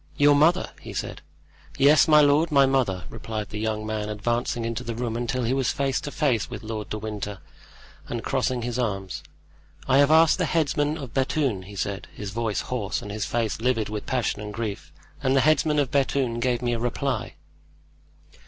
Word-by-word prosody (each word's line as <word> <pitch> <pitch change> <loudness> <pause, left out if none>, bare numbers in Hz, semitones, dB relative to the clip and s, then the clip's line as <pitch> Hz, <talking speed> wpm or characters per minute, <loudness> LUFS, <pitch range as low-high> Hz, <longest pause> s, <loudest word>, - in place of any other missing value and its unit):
"Your 145 0 +6
mother?" 160 +6 +3
he - - -8
said. - - -4 0.6
"Yes, 145 +4 +6
my 150 -1 +7
lord, 150 +3 +4
my 140 -2 +6
mother," 125 -10 +1
replied 110 -2 -5
the 105 - -5
young 110 0 -2
man, 110 -1 -3
advancing 120 +2 -1
into 115 -1 -3
the 115 0 -4
room 115 -1 -3
until 120 +2 -1
he 120 +2 +1
was 135 -2 +1
face 135 -1 -1
to - - -5
face 140 -8 0
with - - -7
Lord 110 -1 -5
de 110 - -3
Winter, 105 -2 -5 0.7
and 120 -1 -3
crossing 130 -2 0
his 120 +1 -3
arms. 95 -6 -2 0.7
"I 135 +1 +5
have 145 0 +5
asked 160 +2 +5
the 180 - +2
headsman 150 -1 +1
of 135 -6 -8
Bethune," 135 -6 0
he 100 +2 -11
said, 100 0 -3
his 105 -2 -6
voice 110 0 -1
hoarse 115 -6 -3
and 105 - -7
his 105 -1 -2
face 115 -2 -1
livid 115 -4 +1
with 105 -1 -5
passion 125 -5 -1
and 105 0 -6
grief. 110 -1 -5 0.3
"And 135 -1 +2
the 135 - +5
headsman 155 0 +3
of 140 -3 +1
Bethune 135 -4 +1
gave 125 0 0
me 120 0 +1
a 115 - -1
reply." 120 0 -2
120 Hz, 195 wpm, -25 LUFS, 110-140 Hz, 0.7 s, my